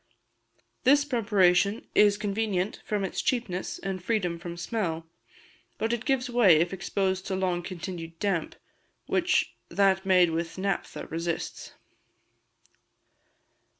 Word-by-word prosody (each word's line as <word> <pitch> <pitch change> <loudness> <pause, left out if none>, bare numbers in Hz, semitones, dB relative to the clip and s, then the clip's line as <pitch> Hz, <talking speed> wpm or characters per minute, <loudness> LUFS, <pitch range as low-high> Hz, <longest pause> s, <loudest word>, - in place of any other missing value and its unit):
This 285 +3 +5
preparation 205 -5 +2
is 205 -1 +5
convenient 205 -2 -1
from 210 -2 -1
its 190 - -3
cheapness 220 -8 -2
and 190 -2 -4
freedom 185 -6 -1
from 175 0 -7
smell; 170 -4 -2 0.7
but 225 +1 0
it 235 0 -3
gives 265 -3 +1
way 240 -8 +5
if 175 +4 +1
exposed 190 0 -1
to 190 - -1
long 185 -2 0
continued 170 -2 -7
damp, 190 -4 -1 0.5
which - - +1 0.2
that 190 +1 +3
made 180 -3 +4
with 165 +1 -3
naphtha 195 0 -3
resists. 165 +1 -4
190 Hz, 115 wpm, -27 LUFS, 175-210 Hz, 0.7 s, This